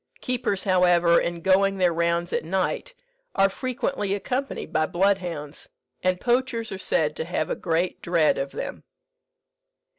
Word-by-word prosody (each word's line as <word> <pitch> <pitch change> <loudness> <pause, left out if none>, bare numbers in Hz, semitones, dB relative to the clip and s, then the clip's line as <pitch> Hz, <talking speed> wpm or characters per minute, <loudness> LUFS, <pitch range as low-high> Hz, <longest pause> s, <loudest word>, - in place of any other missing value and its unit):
Keepers, 245 -6 -1
however, 175 -3 +4
in 170 0 -3
going 195 +2 +3
their 180 -2 +3
rounds 170 +1 0
at - - 0
night, 190 - -2 0.4
are 195 -1 +4
frequently 250 -4 -2
accompanied 260 +6 -3
by 155 0 +2
bloodhounds, 175 -5 -1 0.3
and 185 0 +1
poachers 240 -1 0
are 190 - -4
said 155 -4 0
to - - -3
have 160 -2 -2
a - - 0
great 170 +1 -1
dread 170 -3 +2
of 135 0 -3
them. - - -6
185 Hz, 145 wpm, -25 LUFS, 170-200 Hz, 0.4 s, however